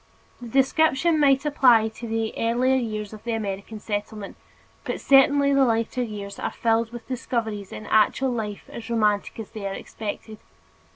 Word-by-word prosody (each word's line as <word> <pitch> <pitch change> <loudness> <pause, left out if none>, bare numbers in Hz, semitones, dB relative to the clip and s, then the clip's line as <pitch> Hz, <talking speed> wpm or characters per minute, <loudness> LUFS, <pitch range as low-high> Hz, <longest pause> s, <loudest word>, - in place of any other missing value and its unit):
The 240 - -7
description 290 +5 +2
might 275 -1 +4
apply 245 -7 +4
to 225 +2 -9
the 225 0 -2
earlier 245 +3 +1
years 215 -4 -3
of 215 - -11
the 235 0 -2
American 210 0 -4
settlement, 205 -1 -5 0.5
but - - -4
certainly 280 +1 +5
the 275 0 +4
later 230 +1 0
years 205 -4 -6
are - - -2
filled 225 0 0
with 240 -1 -9
discoveries 225 -5 -3
in 215 - -8
actual 235 +5 +2
life 210 -4 -5
as 235 0 -9
romantic 210 -2 0
as 220 - -7
they 205 -2 -5
are - - -2
unexpected. 215 +1 -7
225 Hz, 165 wpm, -24 LUFS, 215-260 Hz, 0.5 s, certainly